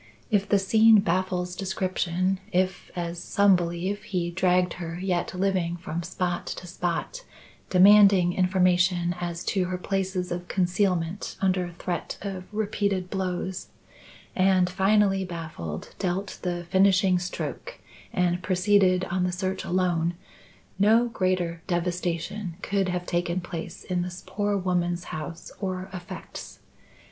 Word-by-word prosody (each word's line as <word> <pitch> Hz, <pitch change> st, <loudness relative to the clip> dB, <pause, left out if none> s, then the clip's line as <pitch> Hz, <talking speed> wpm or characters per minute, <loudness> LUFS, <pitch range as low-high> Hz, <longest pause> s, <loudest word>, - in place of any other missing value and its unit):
If 205 Hz, -1 st, +2 dB
the 205 Hz, -, +5 dB
scene 220 Hz, +3 st, +6 dB
baffles 180 Hz, 0 st, -1 dB
description 185 Hz, -1 st, -1 dB
if, 185 Hz, 0 st, 0 dB
as 170 Hz, -1 st, -4 dB
some 200 Hz, +1 st, +4 dB
believe, 175 Hz, +4 st, -2 dB
he 180 Hz, -5 st, -2 dB
dragged 180 Hz, 0 st, +2 dB
her 165 Hz, 0 st, -5 dB
yet 185 Hz, -1 st, -1 dB
living 180 Hz, -2 st, 0 dB
from 170 Hz, -1 st, -4 dB
spot 175 Hz, 0 st, -3 dB
to -, -, -5 dB
spot, 180 Hz, -, -3 dB, 0.5 s
demanding 195 Hz, -1 st, +7 dB
information 180 Hz, -1 st, +2 dB
as 175 Hz, 0 st, -3 dB
to 190 Hz, -3 st, 0 dB
her 180 Hz, 0 st, -3 dB
places 185 Hz, -1 st, -2 dB
of 175 Hz, 0 st, -4 dB
concealment 180 Hz, -1 st, 0 dB
under 185 Hz, -2 st, +1 dB
threat 175 Hz, 0 st, -4 dB
of 190 Hz, -2 st, -5 dB
repeated 200 Hz, -3 st, -1 dB
blows, 185 Hz, -1 st, -3 dB, 0.7 s
and, 185 Hz, -1 st, +3 dB
finally 195 Hz, +1 st, +3 dB
baffled, 160 Hz, -, -6 dB
dealt 190 Hz, +1 st, -2 dB
the 175 Hz, -1 st, -3 dB
finishing 190 Hz, -1 st, +4 dB
stroke 185 Hz, -, -5 dB, 0.3 s
and 180 Hz, -1 st, +1 dB
proceeded 185 Hz, 0 st, +3 dB
on 185 Hz, 0 st, +1 dB
the 180 Hz, -, +1 dB
search 185 Hz, +1 st, -2 dB
alone, 175 Hz, -2 st, 0 dB, 0.6 s
no 225 Hz, +4 st, +5 dB
greater 185 Hz, -5 st, -1 dB
devastation 175 Hz, +1 st, -2 dB
could 195 Hz, -2 st, 0 dB
have 180 Hz, 0 st, -2 dB
taken 175 Hz, 0 st, -1 dB
place 170 Hz, -2 st, -7 dB
in 180 Hz, -1 st, -1 dB
this 180 Hz, 0 st, -6 dB
poor 205 Hz, 0 st, -1 dB
woman's 175 Hz, -2 st, 0 dB
house 160 Hz, +2 st, -6 dB
or 185 Hz, -1 st, -4 dB
effects. 185 Hz, +1 st, -8 dB
185 Hz, 130 wpm, -26 LUFS, 175-195 Hz, 0.7 s, demanding